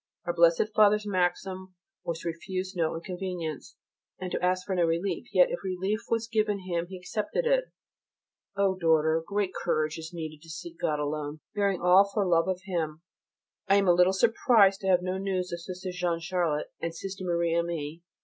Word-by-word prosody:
Our 175 - -1
Blessed 170 +5 +3
Father's 210 0 +5
maxim 185 0 -1 0.3
was 165 -1 -4
to 170 - -2
refuse 185 +3 -5
no 165 -2 0
inconvenience, 175 -3 -5 0.4
and 185 -1 -5
to - - -2
ask 185 0 +1
for 195 - -2
no 180 -2 +2
relief, 170 +6 -1
yet 185 -3 +5
if - - -2
relief 190 +3 -1
was 230 -1 0
given 215 -3 0
him 175 -2 -2
he 190 +1 -8
accepted 210 - -2
it. - - +3 0.9
Oh, 195 -1 +2
daughter, 160 -2 +3
great 200 +1 -1
courage 155 -1 -1
is 160 +1 -7
needed 155 -3 -7
to 165 - -15
seek 330 - -8
God 150 - 0
alone, 150 0 -3
bearing 200 -3 0
all 185 +3 +6
for 205 -1 0
love 165 -1 +3
of 185 -1 -1
Him. 165 -4 -3 0.6
I 195 - +5
am 200 -1 +3
a 175 - +7
little 180 +1 +5
surprised 205 -1 +4
to 190 - -3
have 180 -1 +4
no 185 +1 -2
news 185 -2 -2
of 170 - -4
Sister 185 +1 -6
Jeanne 175 -2 -1
Charlotte, 170 -3 -1
and 165 0 -3
Sister 190 +2 -6
Marie 170 -2 0
Aimée. 170 -2 -2
180 Hz, 190 wpm, -28 LUFS, 165-195 Hz, 0.9 s, a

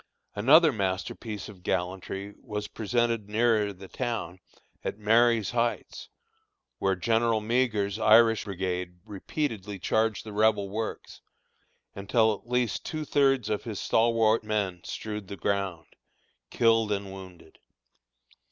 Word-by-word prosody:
Another 150 +9 +6
masterpiece 100 0 -3
of 100 -4 -13
gallantry 95 +2 -3
was 105 -3 -5
presented 115 -1 -1
nearer 110 -1 +2
the 95 0 -12
town, 115 -7 -4 0.4
at - - -3
Marye's 115 0 +3
Heights, 120 -1 -2 0.7
where 95 0 +1
General 115 +4 +1
Meagher's 110 -3 0
Irish 115 0 +5
Brigade 90 -2 -3
repeatedly 105 -1 -4
charged 110 +2 0
the 110 - -8
Rebel 105 -1 +2
works, 110 +2 -5 0.7
until 110 +3 +2
at 110 +3 -11
least 125 -4 0
two 155 -1 -4
thirds 135 -5 +2
of 105 -1 -2
his 110 -4 -5
stalwart 115 -1 +2
men 100 -5 -2
strewed 105 -2 -6
the 100 - -7
ground, 95 -5 -2 0.6
killed 115 -2 +3
and 100 -1 -3
wounded. 90 -4 -13
105 Hz, 120 wpm, -27 LUFS, 100-115 Hz, 0.7 s, Another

